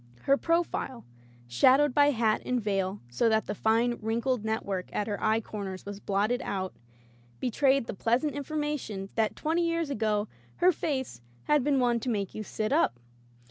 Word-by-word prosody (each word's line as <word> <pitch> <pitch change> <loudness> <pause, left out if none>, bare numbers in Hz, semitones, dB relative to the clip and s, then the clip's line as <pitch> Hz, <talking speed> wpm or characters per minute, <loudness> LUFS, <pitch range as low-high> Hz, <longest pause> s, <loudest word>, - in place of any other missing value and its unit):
Her 275 - +4
profile, 330 -6 -1 0.4
shadowed 255 - +4
by 290 +1 +5
hat 225 -5 +1
and 250 0 0
veil 195 -2 -1
so 120 - +1
that 220 0 +2
the - - -3
fine 230 +3 +1
wrinkled 230 +2 0
network 200 -4 -2
at 205 - -1
her 205 -2 -4
eye 220 +1 +3
corners 195 -4 -6
was 200 0 -6
blotted 205 +5 0
out, 190 -1 -3 0.7
betrayed 265 +1 +2
the - - -5
pleasant 240 +9 +1
information 285 -9 -3
that 220 -2 0
twenty 325 +3 0
years 335 -3 0
ago 215 -4 0 0.3
her 360 +1 +4
face 260 - -3 0.2
had 295 -3 +3
been 280 -1 +2
one 240 -2 +2
to 250 - -3
make 200 -5 -2
you 215 - -5
sit 215 +1 -3
up. 120 +1 +2
230 Hz, 170 wpm, -29 LUFS, 205-275 Hz, 0.7 s, by